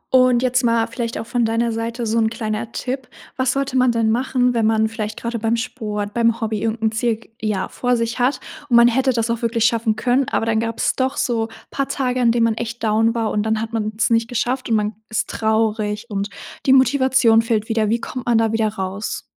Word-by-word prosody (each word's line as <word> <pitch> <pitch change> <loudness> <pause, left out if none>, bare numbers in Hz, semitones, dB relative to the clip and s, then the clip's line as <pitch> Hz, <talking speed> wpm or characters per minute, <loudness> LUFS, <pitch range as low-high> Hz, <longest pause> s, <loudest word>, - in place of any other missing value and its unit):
Und, 255 -1 +4
jetzt 255 0 +2
mal 230 -1 +2
vielleicht 230 0 -4
auch - - -5
von 240 +1 0
deiner 230 +1 +1
Seite 230 +1 -3
so 225 +1 +1
‘n 220 -1 +2
kleiner 220 0 -4
Tipp. 260 0 -4 0.3
Was 260 -1 +1
sollte 275 -1 -2
man 255 -1 +4
denn 225 -1 +1
machen, 250 +1 +1
wenn 230 -2 +1
man 220 0 +2
vielleicht 220 0 -5
gerade 235 0 -3
beim 225 +1 +1
Sport, 210 -4 -4
beim 230 -1 +2
Hobby 220 -2 -2
irgend 225 0 -2
'n 220 - +2
Ziel, 225 +1 0
g 225 - -19
ja 210 -3 -1
vor 245 -1 0
sich 230 +1 -2
hat 250 +3 +1 0.3
und 240 - +3
man 235 0 +8
hätte 260 +2 +2
das 230 -1 0
auch 235 - -2
wirklich 230 -1 +1
schaffen 225 -2 +1
können, 250 +4 +1
aber - - 0
dann 225 -1 +1
gab's 230 0 -1
doch 265 +1 -1
so 230 -2 0 0.2
paar 275 -1 -1
Tage, 255 -2 -1
an 235 -1 +4
denen 235 0 +2
man 230 -1 +3
echt 235 +1 -6
down 225 +1 +2
war 225 -2 0
und 210 - 0
dann 220 +1 0
hat 225 +1 -5
man's 215 0 -1
nicht 230 0 +2
geschafft 250 +2 -2
und 225 - +3
man 210 0 0 0.2
ist 220 - -2
traurig 220 -1 0
und 200 0 -2 0.4
die 265 - +6
Motivation 260 -4 +4
fehlt 225 -2 -1
wieder. 220 -2 0
Wie 230 +2 +1
kommt 255 0 -6
man 235 -2 +4
da 225 -1 +2
wieder 225 -1 +1
raus? 195 0 -4
230 Hz, 230 wpm, -20 LUFS, 220-245 Hz, 0.4 s, man